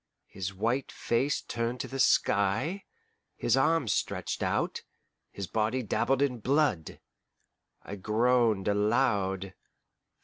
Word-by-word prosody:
his 95 0 -5
white 115 +7 -1
face 135 +5 -1
turned 120 +1 -3
to - - -4
the 135 - -6
sky, 115 - +2 0.5
his - - +2
arms 160 -9 +2
stretched - - -2
out, - - -1 0.5
his 100 - -6
body 110 +6 -1
dabbled 135 +5 +1
in 125 -4 -1
blood. 130 - 0 0.8
I 100 - -7
groaned 110 0 +2
aloud. 100 -3 +1
115 Hz, 110 wpm, -29 LUFS, 100-130 Hz, 0.8 s, sky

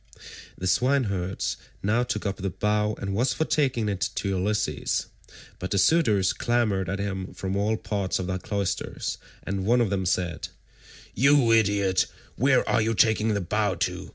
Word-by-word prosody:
The 95 - -5
swineherd 100 -5 +1 0.4
now 110 +4 +2
took 125 -1 -3
up 100 -1 -2
the 95 0 -2
bow 105 +2 0
and 100 0 -3
was 125 +6 +1
for 160 - -1
taking 130 -9 +1
it 100 -3 -2
to 100 - -1
Ulysses, 100 +3 -1 0.5
but 90 - -4
the 100 - 0
suitors 105 - +3
clamoured 110 -6 0
at 100 - -1
him 95 -2 -4
from 95 +2 -3
all 105 +2 +1
parts 100 -4 -2
of 95 - -3
the 95 +1 -2
cloisters, 100 0 -3 0.2
and 95 0 -3
one 120 +5 +3
of 115 -5 +1
them 95 -2 0
said, 90 -2 -1 0.7
"You 140 -2 +4
idiot, 100 -4 +3 0.3
where 130 +2 +3
are 115 - +2
you 110 +1 0
taking 110 +1 +3
the 100 - 0
bow 100 +2 0
to? 90 0 -3
100 Hz, 170 wpm, -26 LUFS, 95-115 Hz, 0.7 s, You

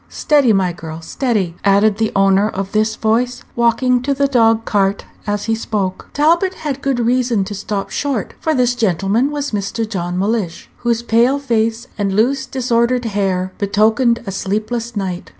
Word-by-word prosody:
Steady, 290 -6 +3
my 190 -3 +1
girl, 160 -1 -8
steady!" 195 -1 -1
added 200 +1 +3
the 220 -1 +1
owner 195 +1 +3
of 195 -1 -4
this 215 +1 +1
voice, 245 +3 0
walking 240 +1 +2
to 275 +2 -1
the 280 +1 +2
dog 225 -4 +3
cart 200 -1 0 0.2
as 205 0 -1
he 225 - 0
spoke. 205 -4 -3
Talbot 340 +6 +2
had 280 -3 -4
good 275 -3 0
reason 240 -3 +1
to 200 +2 -6
stop 200 0 -4
short, 275 -7 -2
for 315 -1 0
this 250 -1 +2
gentleman 215 - +1
was 290 -1 -3
Mr. 215 +2 -2
John 180 -4 -3
Mellish, 200 -3 -2
whose 235 -1 -1
pale 235 +4 +3
face, 230 -3 -1
and 200 -1 0
loose, 265 +5 +1
disordered 245 -1 0
hair 190 -3 -1
betokened 220 +4 +2
a 195 - -4
sleepless 215 +5 -3
night. 185 -3 -4
225 Hz, 170 wpm, -17 LUFS, 200-250 Hz, 0.2 s, Steady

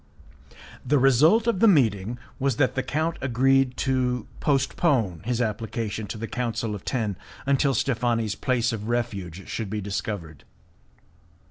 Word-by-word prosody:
The 145 +3 +2
result 145 - +5
of 235 -6 +1
the 230 - +6
meeting 115 - +3 0.2
was 135 -2 +1
that 130 0 +2
the 130 - 0
count 155 +6 -1
agreed 130 +1 +2
to 125 -3 0
postpone 135 - +1
his 120 0 -1
application 110 -1 -3
to 110 - -5
the 115 - -4
Council 115 -3 -2
of 100 - -7
Ten 110 -7 -2 0.3
until 140 0 +2
Steffani's 120 -4 0
place 120 0 0
of 105 -1 -5
refuge 100 -7 -3
should 110 -4 -4
be 105 +1 -2
discovered. 100 -6 -5
120 Hz, 140 wpm, -25 LUFS, 110-135 Hz, 0.3 s, the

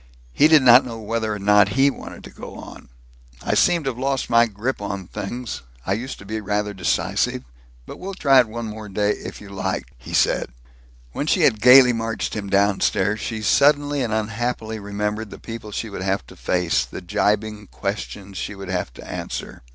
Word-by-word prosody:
He 150 - +5
did 155 -3 +6
not 125 +1 +8
know 115 -2 -7
whether 110 0 -2
or 105 - -2
not 105 0 +4
he 140 +1 +5
wanted - - -10
to - - -11
go - - -10
on. - - -11 0.5
"I - - 0
seem 170 -2 +3
to 135 - -1
have 120 - -11
lost 135 -1 -1
my 115 0 +5
grip 110 +4 -3
on 100 -2 -4
things. 120 +6 -5 0.2
I - - +1
used 120 +6 -4
to 100 - -13
be 110 +2 -4
rather 105 +1 -1
decisive. 95 -7 0 0.4
But - - -10
we'll 195 +1 -6
try 135 -7 +5
it 125 - +4
one 115 +1 -5
more 110 -1 -7
day, 105 +2 +1
if - - -6
you 105 - -12
like," 95 -10 -3
he 60 - -6
said. - - +2 0.6
When 145 - -3
she 180 - +2
had 110 -9 +3
gaily 125 0 +8
marched 115 -1 -3
him 100 -2 -4
downstairs, 100 +1 +2
she 110 -1 -4
suddenly 145 +3 +3
and 120 -3 -1
unhappily 110 +1 -2
remembered 105 +1 -3
the 100 - -10
people 115 -2 -8
she 110 +1 -4
would 100 - -6
have 95 -6 -1
to - - -14
face, 85 -8 0
the 65 - -8
gibing 105 0 -1
questions 100 -1 -5
she 105 - -4
would 95 -2 -8
have 90 -8 -2
to - - -12
answer. - - -6
110 Hz, 200 wpm, -22 LUFS, 100-125 Hz, 0.6 s, not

